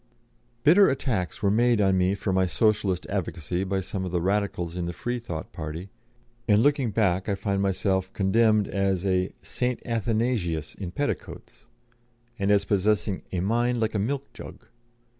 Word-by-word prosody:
Bitter 180 +6 +6
attacks 120 -9 -2
were 100 - +3
made 120 +1 +3
on 95 -2 +3
me 95 +1 +2
for 100 -1 -2
my 95 0 +2
Socialist 105 -3 +1
advocacy 90 -2 -3
by 95 0 -1
some 95 +1 -4
of 90 - -4
the 90 - +1
Radicals 95 -2 -1
in 90 -1 -2
the 85 - -4
Freethought 120 -6 -5
party, 80 +5 -6 0.6
and 105 0 +4
looking 140 -4 +2
back 95 -3 +1
I 100 - +1
find 100 0 -1
myself 95 -1 0
condemned 105 +1 +3
as 95 -2 0
a 95 -1 +1
"Saint 125 0 -2
Athanasius 110 -8 -1
in 95 -4 -6
petticoats," 125 -1 -5 0.7
and 100 0 0
as 100 -1 +3
possessing 100 -1 +1
a 90 - -1
"mind 120 +5 +1
like 110 -1 0
a 105 - 0
milk 135 +7 -3
jug." - - -11
100 Hz, 160 wpm, -26 LUFS, 95-115 Hz, 0.7 s, Bitter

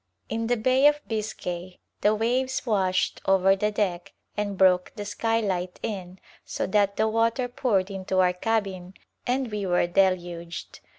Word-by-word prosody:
In 225 +1 -2
the 245 +1 +1
Bay 255 +5 +4
of 295 0 +3
Biscay 185 -5 -4 0.2
the 210 +1 +4
waves 255 +5 0
washed 190 -5 +1
over 195 0 +5
the 210 +2 0
deck 185 -4 -2 0.2
and 205 -2 -2
broke 180 -1 +4
the 205 - -5
skylight 200 -5 -1
in 185 -4 -5 0.3
so - - -3
that 200 0 +2
the 220 - +2
water 230 +3 +1
poured 210 -6 0
into 190 -1 -3
our 180 -1 +4
cabin 195 -2 -2 0.3
and 250 -1 0
we 205 -2 -2
were 175 -1 +2
deluged. 175 -2 -1
200 Hz, 155 wpm, -26 LUFS, 185-225 Hz, 0.3 s, over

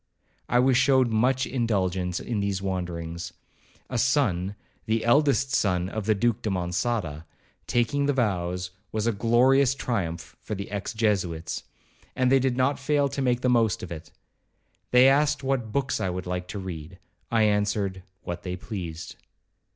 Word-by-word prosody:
I 120 - +3
was 125 0 +4
showed 130 -1 +4
much 125 +4 +2
indulgence 95 -7 -1
in 115 -4 -3
these 100 -1 -1
wanderings. 85 -3 -4 0.5
A 125 - -2
son—the 110 -3 -1
eldest 135 +1 +3
son 90 -2 +1
of 110 0 -4
the 110 - +4
Duke 115 +1 +1
de 110 - -2
Monçada, 90 -3 -2 0.4
taking 130 +4 +1
the 145 - +2
vows, 90 -7 -1 0.2
was 110 0 -1
a 115 - +3
glorious 125 +5 +3
triumph 90 -11 -3
for 105 - -4
the 100 0 -6
ex 100 +2 -4
Jesuits, 90 -7 -1 0.5
and 130 0 +2
they 135 - +6
did 130 -1 0
not 130 +3 +2
fail 145 0 +1
to 140 +1 -3
make 125 -2 +1
the - - +1
most 115 -5 +2
of 90 - -7
it. 80 -1 -7 0.8
They 125 +1 +6
asked 145 +1 +3
what 130 -5 -1
books 140 +1 0
I 95 - 0
would 90 0 -4
like 90 0 -3
to 100 - -6
read,—I 95 +5 -4
answered, 105 -2 +1 0.2
'what 85 0 -5
they 90 0 -4
pleased.' 90 -5 -7
110 Hz, 160 wpm, -26 LUFS, 90-125 Hz, 0.8 s, they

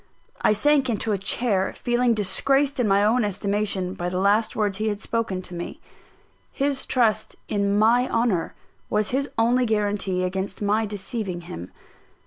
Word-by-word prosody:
I - - +4
sank 275 +4 +3
into 220 -1 -1
a 205 - +1
chair, 195 0 0
feeling 240 -1 +1
disgraced 270 +8 +1
in 240 - +2
my 200 0 +4
own 230 +3 +3
estimation 200 -2 -1
by 175 -1 -3
the 180 - -3
last 205 +4 +2
words 205 -2 -1
he 215 - 0
had 205 -1 -1
spoken 220 -5 -2
to 180 - -8
me. 175 0 -6 0.7
His 275 -1 -1
trust 220 -4 +1
in 200 -1 0
my 235 +4 +4
honour 230 -8 0 0.3
was 210 0 0
his 275 +2 0
only 240 +2 +3
guarantee 205 -3 0
against 190 +2 -2
my 210 +2 +1
deceiving 200 -2 -4
him. 90 - -8
210 Hz, 160 wpm, -24 LUFS, 195-235 Hz, 0.7 s, I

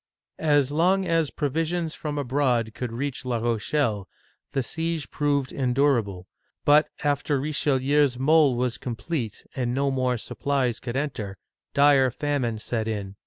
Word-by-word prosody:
'* - - -66
As 145 -3 +3
long 185 +5 +2
as 165 -4 +1
provisions 160 +3 -1
from 150 -1 -4
abroad 125 -5 0
could 125 0 -4
reach 135 +3 -3
La 125 -2 -1
Rochelle, 115 -2 -1 0.4
the 135 - 0
siege 165 +2 -3
proved 140 -3 0
endurable; 125 -8 +1 0.4
but 150 +1 +5
after 145 -1 +1
Richelieu's 140 -1 +1
mole 145 0 +4
was 125 0 -1
complete, 120 -1 -4
and 125 -2 -1
no 140 0 +1
more 130 -2 0
supplies 130 0 -1
could 120 -1 -5
enter, 120 -9 -3 0.4
dire 140 -2 +5
famine 130 -3 -1
set 110 0 -3
in. 100 -3 -4
135 Hz, 140 wpm, -25 LUFS, 120-145 Hz, 0.4 s, but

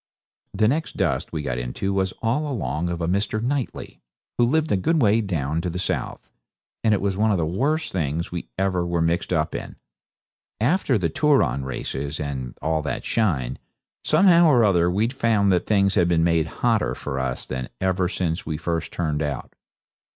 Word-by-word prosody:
The 105 +2 +3
next 155 +7 -1
dust 80 -5 0
we 80 -2 -3
got 60 -2 -2
into 60 +11 -3
was 95 -1 0
all 145 +6 0
along 85 - -2
of 85 0 -3
a 85 - 0
Mr. 100 +4 0
Knightley, 130 +3 -3 0.4
who 120 - +6
lived 155 +5 +1
a - - +4
good 160 - +1
way 110 -2 +4
down 80 -6 -1
to 90 - -2
the 85 - -4
south, 90 - -3 0.5
and 110 -2 +4
it - - -2
was 100 -1 0
one 110 +2 +3
of 100 - +2
the 85 - 0
worst 145 - 0
things 80 -1 -2
we 85 -8 -5
ever 95 -2 +1
were 85 -1 0
mixed 85 +3 0
up 80 -3 0
in. - - -6 0.8
After 135 - +2
the 85 -5 -1
Turon 140 - +2
races 70 +2 -4
and 65 -4 -4
all 80 0 +1
that 75 - -4
shine, 70 - 0 0.4
somehow 170 +1 +5
or 125 -6 +5
other 90 -4 +3
we 100 +5 +1
found 115 -5 +2
that 90 - +1
things 100 -2 +3
had 90 -4 +3
been 85 -2 +2
made 85 -1 +2
hotter 115 +6 0
for 70 -2 -4
us 65 -1 -3
than 65 -1 -5
ever 95 -1 +1
since 85 -3 -2
we 75 -1 -3
first 85 +1 -3
turned 75 -3 -1
out. 75 -4 -4
90 Hz, 190 wpm, -23 LUFS, 80-110 Hz, 0.8 s, who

